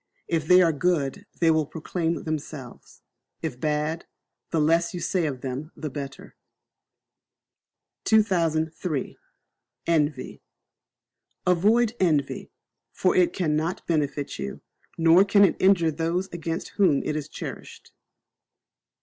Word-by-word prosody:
If 160 Hz, -2 st, -1 dB
they 180 Hz, +1 st, +7 dB
are 165 Hz, -2 st, +3 dB
good 175 Hz, +4 st, -1 dB
they 165 Hz, -1 st, +5 dB
will 155 Hz, -2 st, +1 dB
proclaim 165 Hz, +1 st, -3 dB
themselves, 150 Hz, -5 st, -7 dB, 0.4 s
if 140 Hz, -6 st, -4 dB
bad, 150 Hz, +2 st, -1 dB, 0.4 s
the 165 Hz, -, 0 dB
less 165 Hz, +3 st, +2 dB
you -, -, -3 dB
say 175 Hz, -2 st, 0 dB
of 130 Hz, -4 st, -5 dB
them 135 Hz, +5 st, -5 dB
the 155 Hz, -3 st, -5 dB
better. 135 Hz, 0 st, -8 dB, 1.7 s
2003. 165 Hz, -, +1 dB, 0.7 s
Envy. 155 Hz, -3 st, 0 dB, 1.0 s
Avoid 215 Hz, +6 st, +3 dB
Envy; 150 Hz, -7 st, 0 dB, 0.4 s
for 185 Hz, -, +1 dB
it 180 Hz, -1 st, +4 dB
cannot 160 Hz, -1 st, -1 dB
benefit 145 Hz, -3 st, -1 dB
you, 65 Hz, -1 st, -5 dB, 0.4 s
nor 165 Hz, +3 st, +6 dB
can 200 Hz, 0 st, +5 dB
it -, -, +1 dB
injure 185 Hz, -4 st, +4 dB
those 165 Hz, +4 st, -1 dB
against 165 Hz, -1 st, -4 dB
whom 180 Hz, -9 st, +2 dB
it 150 Hz, -, -2 dB
is 155 Hz, -1 st, -4 dB
cherished. -, -, -9 dB
165 Hz, 115 wpm, -25 LUFS, 150-180 Hz, 1.7 s, they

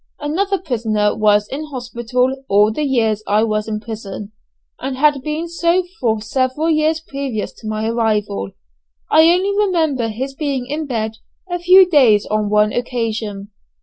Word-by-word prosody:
Another 385 Hz, +7 st, -1 dB
prisoner 220 Hz, -, -1 dB
was 210 Hz, -1 st, +3 dB
in 295 Hz, +3 st, -5 dB
hospital 250 Hz, -1 st, -2 dB
all 205 Hz, +2 st, +4 dB
the 260 Hz, -, -3 dB
years 230 Hz, -7 st, +1 dB
I 210 Hz, +2 st, +3 dB
was 215 Hz, -1 st, -1 dB
in 215 Hz, -1 st, -3 dB
prison, 210 Hz, -2 st, -7 dB, 0.5 s
and 260 Hz, 0 st, -4 dB
had 295 Hz, -1 st, +3 dB
been 310 Hz, +3 st, -3 dB
so 340 Hz, +2 st, +1 dB, 0.2 s
for 220 Hz, -3 st, +1 dB
several 260 Hz, +7 st, 0 dB
years 310 Hz, +1 st, +2 dB
previous 275 Hz, -8 st, -5 dB
to 220 Hz, -, -8 dB
my 215 Hz, 0 st, -2 dB
arrival. 210 Hz, -, -1 dB, 0.6 s
I 320 Hz, +1 st, +6 dB
only 385 Hz, +3 st, +1 dB
remember 325 Hz, -, +1 dB
his 255 Hz, +5 st, -4 dB
being 275 Hz, -3 st, -2 dB
in 295 Hz, +3 st, -4 dB
bed 220 Hz, -3 st, -3 dB, 0.3 s
a 355 Hz, -, -1 dB
few 365 Hz, +2 st, +7 dB
days 250 Hz, -, +4 dB
on 215 Hz, -1 st, -1 dB
one 210 Hz, 0 st, +3 dB
occasion. 225 Hz, -4 st, -3 dB
245 Hz, 155 wpm, -18 LUFS, 215-305 Hz, 0.6 s, few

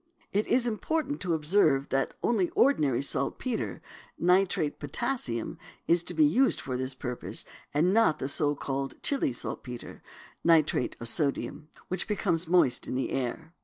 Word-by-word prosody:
It 205 Hz, +2 st, +1 dB
is 245 Hz, 0 st, +2 dB
important 290 Hz, +6 st, -2 dB
to 175 Hz, -3 st, 0 dB
observe 150 Hz, -3 st, +2 dB
that 135 Hz, 0 st, 0 dB
only 200 Hz, -7 st, +2 dB
ordinary 150 Hz, -, +3 dB
saltpetre 220 Hz, -, -2 dB, 0.3 s
(nitrate 180 Hz, -4 st, +2 dB
of -, -, -36 dB
potassium) 140 Hz, -, -2 dB, 0.3 s
is 170 Hz, 0 st, +4 dB
to -, -, -3 dB
be 310 Hz, -, +5 dB
used 270 Hz, -2 st, +3 dB
for 130 Hz, -2 st, -4 dB
this 130 Hz, +1 st, -3 dB
purpose, 125 Hz, -1 st, -3 dB, 0.3 s
and 165 Hz, +6 st, +2 dB
not 225 Hz, -8 st, +4 dB
the 135 Hz, -, -3 dB
so 145 Hz, +1 st, +1 dB
called 135 Hz, -1 st, -3 dB
Chili 275 Hz, -, +1 dB
saltpetre 125 Hz, 0 st, -7 dB, 0.4 s
(nitrate 160 Hz, -6 st, +3 dB
of 115 Hz, -, -6 dB
sodium) 140 Hz, +1 st, 0 dB, 0.2 s
which 185 Hz, -, -2 dB
becomes 180 Hz, -5 st, 0 dB
moist 165 Hz, -8 st, +3 dB
in -, -, -3 dB
the 130 Hz, -, -1 dB
air. 135 Hz, +6 st, -3 dB
160 Hz, 155 wpm, -28 LUFS, 135-205 Hz, 0.4 s, be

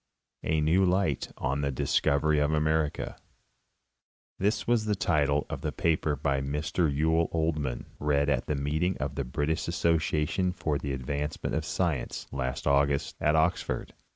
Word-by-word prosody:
A 80 Hz, -1 st, +1 dB
NEW 85 Hz, +5 st, +3 dB
LIGHT 90 Hz, -6 st, +1 dB
ON 70 Hz, +2 st, -1 dB
THE 70 Hz, -, 0 dB
DISCOVERY 75 Hz, +3 st, +2 dB
OF 75 Hz, +1 st, +2 dB
AMERICA 75 Hz, 0 st, 0 dB, 1.2 s
This 105 Hz, +1 st, +1 dB
was 115 Hz, -2 st, +2 dB
the 105 Hz, -1 st, +1 dB
title 75 Hz, -6 st, +1 dB
of -, -, -6 dB
a -, -, -1 dB
paper 80 Hz, -2 st, +1 dB
by 70 Hz, -1 st, 0 dB
Mr 75 Hz, +3 st, 0 dB
Yule 80 Hz, +3 st, +2 dB
Oldham, 75 Hz, -6 st, -1 dB
read 70 Hz, -1 st, +2 dB
at 65 Hz, -4 st, 0 dB
the 75 Hz, -, 0 dB
meeting 80 Hz, +6 st, 0 dB
of 65 Hz, +1 st, -3 dB
the 70 Hz, -, -2 dB
British 75 Hz, +5 st, -1 dB
Association 85 Hz, +1 st, +1 dB
for 75 Hz, -5 st, -1 dB
the 70 Hz, -, -3 dB
Advancement 70 Hz, +4 st, -3 dB
of -, -, 0 dB
Sci 85 Hz, -6 st, +1 dB
ence, -, -, -6 dB
last 65 Hz, -1 st, -3 dB
August, 70 Hz, 0 st, +2 dB
at 75 Hz, +1 st, +3 dB
Oxford. 80 Hz, +3 st, 0 dB
75 Hz, 155 wpm, -28 LUFS, 70-80 Hz, 1.2 s, NEW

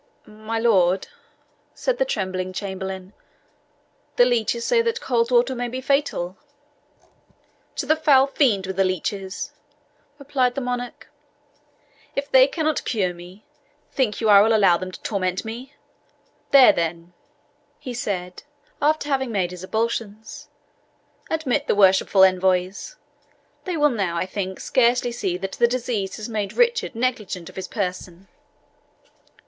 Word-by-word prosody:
"My 215 Hz, +1 st, -6 dB
lord," 195 Hz, -5 st, +2 dB, 0.7 s
said -, -, -1 dB
the -, -, +3 dB
trembling 185 Hz, -, -3 dB
chamberlain, 190 Hz, 0 st, -6 dB, 1.0 s
"the 245 Hz, -, +6 dB
leeches 235 Hz, -1 st, 0 dB
say 480 Hz, -2 st, +3 dB
that 465 Hz, 0 st, -1 dB
cold 235 Hz, -, 0 dB
water 245 Hz, +1 st, +3 dB
may 245 Hz, -1 st, -3 dB
be 255 Hz, +2 st, -5 dB
fatal." 260 Hz, -10 st, -1 dB, 1.4 s
"To -, -, -3 dB
the 315 Hz, -, +3 dB
foul 290 Hz, -4 st, +5 dB
fiend 245 Hz, -9 st, +1 dB
with 190 Hz, 0 st, -5 dB
the 195 Hz, -, +4 dB
leeches!" 190 Hz, +1 st, -3 dB, 0.7 s
replied 265 Hz, -3 st, 0 dB
the -, -, -1 dB
monarch; 245 Hz, -1 st, -5 dB, 1.1 s
"if 280 Hz, +1 st, -3 dB
they 260 Hz, 0 st, +7 dB
cannot 310 Hz, 0 st, -1 dB
cure 190 Hz, -6 st, -1 dB
me, 180 Hz, +4 st, -14 dB, 0.5 s
think 240 Hz, -6 st, 0 dB
you 225 Hz, -, 0 dB
I 200 Hz, -1 st, +8 dB
will 220 Hz, +2 st, +4 dB
allow 195 Hz, -5 st, +5 dB
them 185 Hz, +1 st, -5 dB
to 180 Hz, -, -10 dB
torment 185 Hz, -2 st, -2 dB
me? 250 Hz, +6 st, -8 dB, 0.7 s
There, 270 Hz, -2 st, +8 dB
then," 170 Hz, +1 st, -3 dB, 0.6 s
he 250 Hz, -, -7 dB
said, 185 Hz, -6 st, -4 dB, 0.4 s
after 300 Hz, 0 st, +1 dB
having 265 Hz, -3 st, -1 dB
made 185 Hz, -4 st, -1 dB
his 180 Hz, 0 st, -9 dB
ablutions, 220 Hz, 0 st, -4 dB, 0.8 s
"admit 295 Hz, -2 st, -1 dB
the -, -, +2 dB
worshipful 190 Hz, -1 st, +5 dB
envoys; 185 Hz, -, +1 dB, 0.7 s
they 365 Hz, -3 st, -2 dB
will 295 Hz, -1 st, +3 dB
now, 195 Hz, -7 st, -2 dB
I 170 Hz, -, 0 dB
think, 190 Hz, 0 st, -5 dB
scarcely 245 Hz, -1 st, +2 dB
see 190 Hz, -6 st, -2 dB
that 195 Hz, +1 st, -6 dB
disease 235 Hz, -5 st, 0 dB
has 215 Hz, -, -6 dB
made 210 Hz, -4 st, -3 dB
Richard 475 Hz, -, +1 dB
negligent 220 Hz, -8 st, -2 dB
of -, -, -15 dB
his 190 Hz, -, -5 dB
person." 185 Hz, -2 st, -5 dB
220 Hz, 140 wpm, -23 LUFS, 190-260 Hz, 1.4 s, I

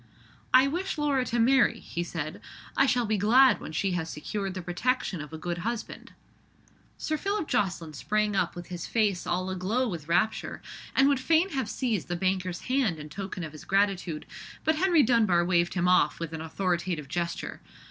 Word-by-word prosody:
"I 255 Hz, +1 st, +7 dB
wish 345 Hz, +6 st, -2 dB
Laura 285 Hz, -3 st, +1 dB
to 240 Hz, -, -2 dB
marry," 245 Hz, +2 st, +4 dB
he 170 Hz, -, -4 dB
said; 155 Hz, -3 st, -5 dB, 0.3 s
"I 275 Hz, -, +4 dB
shall 250 Hz, -2 st, +2 dB
be 215 Hz, -1 st, 0 dB
glad 255 Hz, +6 st, +5 dB
when -, -, -7 dB
she 190 Hz, +5 st, 0 dB
has 170 Hz, -2 st, -2 dB
secured 195 Hz, +5 st, -4 dB
the 185 Hz, -, -4 dB
protection 185 Hz, 0 st, -1 dB
of 150 Hz, -, -9 dB
a 160 Hz, -, -6 dB
good 175 Hz, +2 st, -4 dB
husband." 235 Hz, +4 st, -5 dB, 0.8 s
Sir 310 Hz, -, -2 dB
Phillip 395 Hz, -1 st, -2 dB
Jocelyn 175 Hz, -6 st, -1 dB
sprang 210 Hz, -, 0 dB
up -, -, 0 dB
with 175 Hz, 0 st, -8 dB
his 175 Hz, -1 st, -5 dB
face 210 Hz, -5 st, 0 dB
all 185 Hz, +1 st, -1 dB
a -, -, -2 dB
glow 215 Hz, +8 st, 0 dB
with 165 Hz, -8 st, -5 dB
rapture, 180 Hz, +6 st, 0 dB, 0.4 s
and 270 Hz, -, +5 dB
would 280 Hz, -2 st, +3 dB
fain 325 Hz, +7 st, +3 dB
have 270 Hz, -7 st, -2 dB
seized 230 Hz, -, -1 dB
the 175 Hz, -, -2 dB
banker's 185 Hz, 0 st, -1 dB
hand 255 Hz, -10 st, +1 dB
in 150 Hz, 0 st, -9 dB
token 190 Hz, +2 st, -5 dB
of 155 Hz, -, -6 dB
his 155 Hz, -, -11 dB
gratitude; 195 Hz, -5 st, 0 dB, 0.4 s
but 315 Hz, 0 st, +2 dB
Henry 345 Hz, -3 st, +4 dB
Dunbar 215 Hz, -8 st, +3 dB
waved 175 Hz, 0 st, +2 dB
him 180 Hz, -1 st, +1 dB
off 180 Hz, -5 st, +3 dB
with 165 Hz, -1 st, -5 dB
an 160 Hz, -, -4 dB
authoritative 170 Hz, -2 st, -2 dB
gesture. 170 Hz, +4 st, -3 dB
195 Hz, 190 wpm, -28 LUFS, 175-250 Hz, 0.8 s, I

